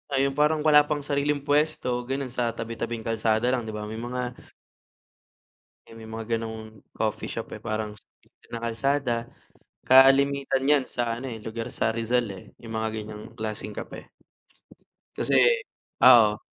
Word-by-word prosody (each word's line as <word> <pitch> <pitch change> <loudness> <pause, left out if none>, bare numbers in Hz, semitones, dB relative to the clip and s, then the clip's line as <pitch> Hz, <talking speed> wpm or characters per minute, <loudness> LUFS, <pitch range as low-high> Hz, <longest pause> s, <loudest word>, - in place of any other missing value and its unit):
Ay, 135 -1 +2
yung 140 - -1
parang 150 +2 +2
wala 150 -1 +6
pang 150 -1 -2
sariling 145 0 0
puwesto, 145 -4 +1
ganun, 135 -1 -3
sa 120 -2 0
tabi-tabing 115 0 -5
kalsada 115 +1 +1
lang, 120 -3 -1
di 110 - -5
ba, 105 0 -5
may 110 +1 -6
mga 125 +1 -4 1.5
Eh 115 - -13
may 110 - -10
mga 115 +1 -3
gano'ng 110 -1 -7 0.2
coffee - - -2
shop - - -6
eh - - -19
parang 110 -1 -4
s - - -22 0.5
na 115 - -4
kalsada 120 0 0 0.6
kalimitan 135 +1 +5
nyan 145 -1 +4
sa 120 -1 -2
ano 130 +2 -5
eh, 110 -3 -7
lugar 115 +1 -5
sa - - +1
Rizal 115 +2 0
eh, 95 - -11 0.2
yung 115 -1 -8
mga 110 0 -1
ganiyang 105 -1 -7
klaseng 110 -2 -5
kape. - - -9 1.0
Kasi, - - +1 0.7
ah, 115 -4 +8
oo, 105 - -11
120 Hz, 160 wpm, -26 LUFS, 110-135 Hz, 1.5 s, ah